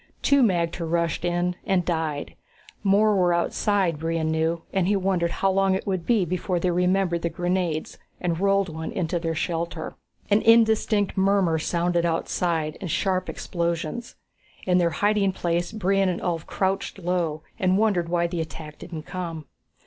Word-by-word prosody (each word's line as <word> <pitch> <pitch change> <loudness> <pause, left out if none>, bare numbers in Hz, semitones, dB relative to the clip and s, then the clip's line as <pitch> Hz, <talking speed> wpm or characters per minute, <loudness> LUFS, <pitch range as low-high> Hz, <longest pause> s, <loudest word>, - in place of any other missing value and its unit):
Two 280 -1 +4
magter 170 -6 +1
rushed 170 -1 0
in, 175 +1 0
and 190 -4 +1
died. 160 -4 -2 0.5
More 205 +1 +4
were 180 -2 +3
outside, 180 -2 +1
Brion 165 0 -1
knew, 160 +1 0
and 190 -2 +1
he 205 - +3
wondered 185 -3 +1
how 195 +3 +1
long 195 0 +2
it 190 - -4
would 185 -4 -2
be 225 -6 +3
before 180 +1 -1
they 180 +1 +1
remembered 180 0 +1
the 170 - 0
grenades 175 -3 -2 0.2
and 170 -2 -1
rolled 195 0 +2
one 160 -1 -5
into 180 -5 -1
their 165 -1 -2
shelter. 165 0 -3 0.4
An 205 +2 +5
indistinct 220 -3 +3
murmur 190 -4 +3
sounded 170 +1 0
outside, 165 -1 -1
and 185 - -4
sharp 185 +2 0
explosions. 170 +5 -3 0.5
In 180 -1 +3
their 170 -1 +3
hiding 205 +2 +1
place, 175 -1 -1
Brion 195 -2 +1
and 175 - -2
Ulv 170 -2 -3
crouched 190 +1 -1
low 170 -4 -1 0.2
and 185 -2 +3
wondered 200 -6 +1
why 170 0 +1
the 170 -1 -2
attack 155 -1 -8
didn't 165 -3 -7
come. 170 -3 -5
175 Hz, 165 wpm, -25 LUFS, 165-195 Hz, 0.5 s, An